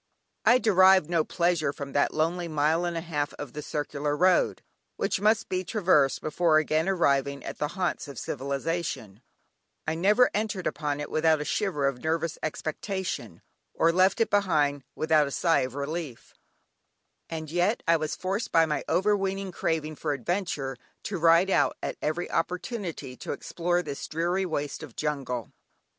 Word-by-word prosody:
I 245 - +7
derived 190 -7 +5
no 165 -2 +3
pleasure 170 -4 +1
from 140 -1 -7
that 145 - +2
lonely 170 +3 0
mile 155 +2 +1
and 170 -1 -2
a - - -2
half 150 -4 -3
of 145 -4 -8
the 150 - -5
circular 145 0 -2
road, 185 +2 +3 0.3
which - - -1
must 215 +2 +3
be 185 0 -1
traversed 170 -8 +2
before 155 0 +2
again 155 +3 +1
arriving 140 -6 +1
at - - -6
the 150 - 0
haunts 180 -4 -1
of 140 -3 -9
civilisation; 140 - -3 0.6
I 160 - 0
never 205 +9 +4
entered 210 -3 -2
upon 145 -2 -2
it 150 - -6
without 155 0 +3
a 150 - -3
shiver 165 -8 0
of 130 -3 -3
nervous 165 +1 -1
expectation, 155 - -4 0.3
or 165 - +4
left 185 +2 +3
it 225 - +1
behind 150 -9 +2
without 155 -2 +3
a - - -4
sigh 165 +4 +2
of 130 +1 -3
relief, 145 -2 -5 1.0
and 160 -2 -5
yet 175 +6 +1
I 165 0 +5
was 155 -1 -3
forced 195 +4 -3
by 165 0 +5
my 150 -2 -2
overweening 195 +1 +1
craving 155 -3 -2
for 150 -2 -1
adventure, 140 - -2 0.3
to 195 -4 -3
ride 170 +3 +5
out 145 -7 +2
at - - -3
every 165 +3 -1
opportunity 180 - -3
to - - -4
explore 175 +4 -1
this 145 -3 -6
dreary 175 +4 0
waste 145 -3 -3
of 150 -7 -10
jungle! 135 -6 -3
160 Hz, 165 wpm, -27 LUFS, 145-180 Hz, 1.0 s, I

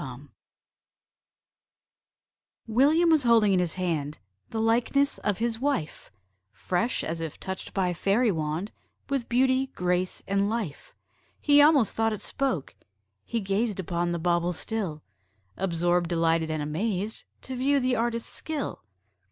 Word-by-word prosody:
William 295 +9 +4
was 315 -2 +5
holding 230 -5 +4
in 185 - +3
his 175 -2 -1
hand 155 -5 -2 0.3
The 225 - -3
likeness 240 +5 +2
of 205 -3 -1
his 230 0 -1
wife! 260 - -2 0.4
Fresh, 230 +7 -1
as 165 +1 -3
if 160 -2 -5
touched 190 0 -6
by 185 -2 +1
fairy 205 +6 +2
wand, 160 +4 -2 0.4
With 275 -4 -1
beauty, 260 +2 +3
grace, 180 0 -1
and 200 +1 +1
life. 215 -10 -4 0.4
He 290 0 +5
almost 290 -6 +5
thought 225 0 +1
it 210 - -5
spoke: 260 - -2 0.5
he 230 -1 -2
gazed 200 +1 -1
Upon 175 -1 -1
the 170 - -1
bauble 175 +1 +1
still, 175 -5 -4 0.5
Absorbed, 175 -1 +1
delighted, 165 -1 +1
and 155 -1 -2
amazed, 195 +7 -2 0.2
To 260 - -5
view 275 +3 +2
the 255 -1 +1
artist's 230 0 -2
skill. 305 - -4
205 Hz, 135 wpm, -27 LUFS, 175-240 Hz, 0.5 s, was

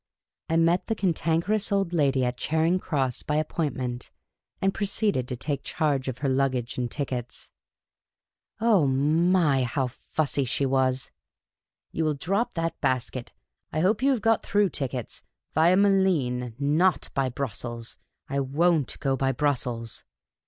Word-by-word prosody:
I 165 - +2
met 165 +2 +2
the 225 - 0
Cantankerous 180 +3 0
Old 195 -3 +1
Lady 140 -5 +2
at 125 0 -1
Charing 160 +6 +1
Cross, 135 -8 -1
by 150 - -2
appointment, 130 -6 -2 0.5
and 195 0 +1
proceeded 200 - 0
to 125 - -4
take 140 +2 -3
charge 145 -6 -1
of 130 -2 -3
her - - +3
luggage 130 -2 0
and 120 -1 -1
tickets. 125 -4 -4 1.1
Oh 215 -9 +4
my, 150 +2 +3
how 130 +2 0
fussy 140 +3 -1
she 130 +2 0
was! 130 -1 +1 0.2
* - - -67
' - - -63
You 165 - -1
will 155 -1 +1
drop 200 - -1
that 165 0 -2
basket! 130 -2 -1 0.4
I 155 - 0
hope 205 +6 +2
you 275 - +3
have 255 -5 +1
got 225 0 +3
through 205 -1 +2
tickets, 130 -6 -5 0.3
via 170 +4 +4
Malines, 165 - +2
nol 155 +6 +3 0.2
by 135 -1 +1
Brussels 120 -2 -5 0.2
— - - -56
I 140 0 -1
won't 150 +2 +1
go 135 -1 +1
by 135 0 +1
Bru.ssels. 125 -4 -2
145 Hz, 150 wpm, -26 LUFS, 130-175 Hz, 1.1 s, Oh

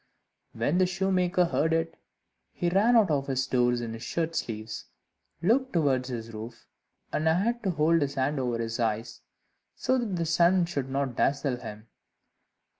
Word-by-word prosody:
When 175 +5 0
the 185 - +4
shoemaker 185 -1 +1
heard 160 -1 +1
it, 165 0 0 0.6
he 175 - 0
ran 215 +6 +4
out 210 -7 +5
of 140 -2 0
his 130 -1 0
door 125 -1 +2
in 120 -2 -2
his 115 - -8
shirt 165 +6 -2
sleeves, 110 -4 -4 0.6
looked 255 +7 +2
towards 135 -6 +1
his 115 -2 -6
roof, 115 +2 -8 0.5
and 155 - 0
had 210 +9 +1
to 200 - -1
hold 165 -1 +2
his 140 0 -1
hand 135 +2 0
over 125 -2 -1
his 115 0 -3
eyes, 115 0 -2 0.5
so 260 0 +1
that 220 -6 -2
the 170 -1 -1
sun 170 +2 +4
should 140 -6 -3
not 135 -2 -1
dazzle 140 -1 +1
him. 105 -2 -9
150 Hz, 170 wpm, -28 LUFS, 125-180 Hz, 0.6 s, out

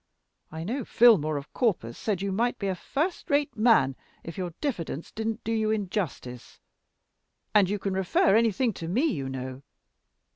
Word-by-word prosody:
I 160 +1 -5
know 245 +9 -2
Filmore 190 -14 +4
of 140 +1 -8
Corpus 175 - 0
said 200 -4 -2
you 200 - -1
might 240 +5 0
be 200 - -4
a 190 - +1
first 310 - -3
rate 285 0 +1
man 215 - +4 0.3
if 165 - -7
your 180 -3 -4
diffidence 170 - -3
didn't 220 +1 -3
do 225 - -2
you 220 -1 +1
injustice. 185 - -3 0.9
And 200 -3 +5
you 205 - 0
can 195 -1 -3
refer 190 +1 +2
anything 225 +1 +2
to 165 - -7
me, 220 - +1
you 140 - -1
know. 130 0 -6
200 Hz, 170 wpm, -27 LUFS, 165-230 Hz, 0.9 s, And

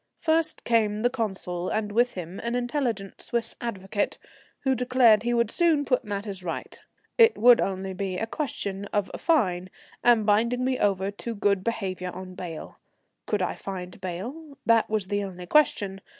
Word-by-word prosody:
First 325 0 +1
came 215 -2 +1
the 245 - +3
Consul, 190 -7 -3
and 215 -1 -1
with 240 +3 +2
him 180 +1 -6
an 235 +1 -2
intelligent 240 -5 -2
Swiss 235 -1 -2
advocate, 205 -3 -2 0.4
who 265 -1 +2
declared 250 -3 +4
he 240 +2 -1
would 235 -2 +2
soon 325 -4 +3
put 255 -2 +1
matters 200 -3 -5
right. 165 -2 -5 0.4
It 460 0 +7
would 240 +1 +7
only 190 0 -2
be 185 -1 -3
a 225 - -1
question 205 -7 -4
of 205 -1 -1
a - - -5
fine, 185 - +1 0.3
and 235 -3 +5
binding 235 +4 +2
me 260 -1 0
over 195 -1 +1
to 230 +3 -6
good 200 -2 +1
behaviour 190 -5 -2
on 185 +1 -8
bail. 175 -3 -8 0.5
Could 205 -3 0
I 180 - -1
find 185 0 -7
bail? 250 - -6
That 230 0 +4
was 215 -3 -1
the 205 0 0
only 180 -2 -7
question. 200 -6 +2
210 Hz, 170 wpm, -26 LUFS, 190-245 Hz, 0.5 s, It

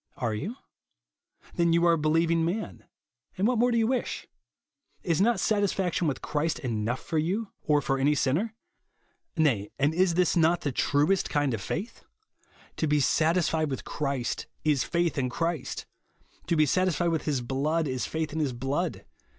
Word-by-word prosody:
Are 115 -3 -1
you? 180 - -4 1.0
Then 170 -1 +2
you 170 +1 +3
are 170 - +5
a - - +2
beheving 165 +2 +2
man; 190 +7 -3 0.5
and 195 +3 +2
what 245 -2 +1
more 245 +1 +3
do 235 - +2
you 225 - +3
wish? 255 +1 -2 0.8
Is 170 0 +1
not 235 +3 +3
satisfaction 195 -5 +1
with 140 - -2
Christ 155 +2 -1
enough 120 -2 -2
for 160 - -1
you 195 +7 -1
or 150 -2 +2
for 135 0 0
any 145 +2 +3
sinner? 170 - 0 0.8
Nay, 120 -11 +2
and 145 +3 +2
is 175 0 +2 0.2
not 170 +1 +3
this - - -12
the 145 - 0
truest 150 +9 +1
kind 145 -3 +1
of 115 - -3
faith? 195 +9 -5 0.7
To 160 - 0
be 150 0 +3
satisfied 160 +1 +2
with 135 - -5
Christ, 140 -5 -2 0.2
is 150 -4 +2
faith 170 -4 0
in 130 -2 0
Christ. 165 +2 -3 0.6
To 170 - +2
be 155 -1 +4
satisfied 175 +1 +1
with 160 -2 -1
his 140 -5 0
blood, 145 +6 0
is 130 -2 -2
faith 160 -1 -3
in 160 - -2
his 145 -5 0
blood. 140 +8 -2
160 Hz, 175 wpm, -27 LUFS, 140-175 Hz, 1.0 s, are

